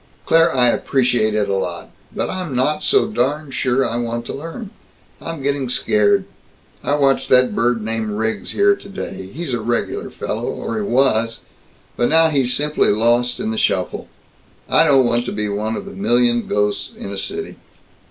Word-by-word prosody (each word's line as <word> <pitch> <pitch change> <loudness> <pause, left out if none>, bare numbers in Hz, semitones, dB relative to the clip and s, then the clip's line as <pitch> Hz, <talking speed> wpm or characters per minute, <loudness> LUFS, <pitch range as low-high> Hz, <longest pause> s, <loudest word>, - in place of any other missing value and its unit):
"Claire, 165 +1 +4
I 125 -2 +5
appreciate 120 -5 +1
it 105 -1 +1
a - - -1
lot 90 -3 -4 0.2
but - - -2
I'm 180 -7 -4
not 150 +5 +1
so 410 -1 +3
darn 145 - -1
sure 130 0 +1
I 115 - -3
want 120 0 -3
to - - -5
learn. 165 - -7 0.5
I'm 160 -5 -6
getting 140 -2 -1
scared. 395 - +2 0.6
I 145 - +1
watched 135 -2 +1
that 125 -1 +4
bird 120 -1 0
named 110 0 -2
Riggs 110 +1 -2
here 405 0 +4
today. 190 - -8
He's 160 -1 -5
a 120 - -1
regular 120 +2 -2
fellow, - - -4
or 115 - -4
he - - -1
was, 115 0 +1 0.6
but 120 - +2
now 160 +1 +5
he's 135 -5 +1
simply 150 +3 +2
lost 120 +3 +2
in 215 +3 -2
the 220 - -2
shuffle. - - -1 0.6
I - - +4
don't 135 -4 +5
want 120 0 +1
to - - -3
be 105 0 -2
one 105 +2 -2
of - - -6
the 200 - -8
million 120 - +1
ghosts 105 0 -1
in 100 - -7
a - - -4
city. - - -4
125 Hz, 180 wpm, -19 LUFS, 115-150 Hz, 0.6 s, I